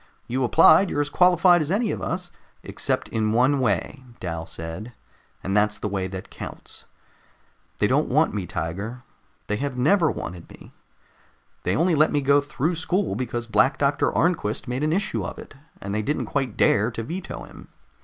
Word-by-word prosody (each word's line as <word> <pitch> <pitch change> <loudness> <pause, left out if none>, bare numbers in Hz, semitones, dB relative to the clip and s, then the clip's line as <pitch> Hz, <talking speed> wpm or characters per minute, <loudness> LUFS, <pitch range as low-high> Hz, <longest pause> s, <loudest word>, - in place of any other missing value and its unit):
"You 130 +2 -1
applied, 160 +8 +6
you're - - -2
as 145 0 -1
qualified 180 -1 +5
as 150 - -2
any 210 +4 +1
of - - -4
us 180 -1 -4 0.2
" - - -37
"Except - - -2
in 110 -1 0
one 130 +4 +3
way," 125 - -1 0.2
Dal 80 -2 -5
said, 80 +8 -7 0.5
"and 95 +1 -2
that's 105 0 +2
the - - -3
way 95 -2 -2
that 95 0 -8
counts. - - -10 0.9
They - - +2
don't - - +2
want - - +2
me, - - -3
Tiger. 105 +9 -5 0.4
They 105 - -2
have 140 0 -3
never 160 +6 +3
wanted 85 -8 -6
me. - - -15 0.9
They 90 - 0
only 170 - +2
let 155 0 +4
me 145 - +1
go 140 +1 +4
through 150 +3 -2
school 175 +4 -1
because 120 -2 -3
Black 130 +4 +2
Doctor 140 0 +1
Arnquist 165 -11 0
made 125 +2 -2
an 155 - +1
issue 195 +5 -1
of - - -6
it, 225 -6 -11 0.3
and 100 +1 -5
they 110 - 0
didn't 145 +8 -1
quite 135 -6 -2
dare 105 +3 +3
to 115 -1 -5
veto 180 +9 -6
him. - - -13
130 Hz, 185 wpm, -24 LUFS, 105-160 Hz, 0.9 s, applied